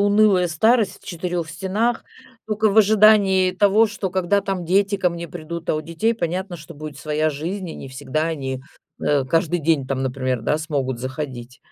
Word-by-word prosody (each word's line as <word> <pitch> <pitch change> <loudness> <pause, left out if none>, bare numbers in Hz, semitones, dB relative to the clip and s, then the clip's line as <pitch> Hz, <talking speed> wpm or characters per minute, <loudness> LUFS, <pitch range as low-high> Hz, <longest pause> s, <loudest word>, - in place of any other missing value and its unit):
унылая 205 -3 +4
старость 210 +4 +2
в - - -20
4 175 -2 -3
стенах, 200 +8 -1 0.4
тока 215 0 +1
в 215 - +3
ожидании 205 -3 +5
того, 205 +4 +4
что, 205 -3 -4
когда 190 +2 +1
там 195 -2 -3
дети 200 +3 +2
ко 180 -2 +1
мне 170 0 -6
придут. 170 0 -7
А - - +1
у 155 - -1
детей 165 +9 -1
понятно, 180 -2 -3
что 150 - -11
будет 150 -1 -8
своя 155 +2 0
жизнь, 175 +6 -4
и - - -7
не 135 - -8
всегда 135 +3 -3
они, 135 -5 -4 0.4
э, 145 -3 +2
каждый 165 +4 +1
день 155 -4 +1
там, 135 -1 -1
например, 130 -2 -2
да, 150 - +1
смогут 140 -6 -2
заходить. 130 -2 -6
170 Hz, 185 wpm, -22 LUFS, 150-200 Hz, 0.4 s, ожидании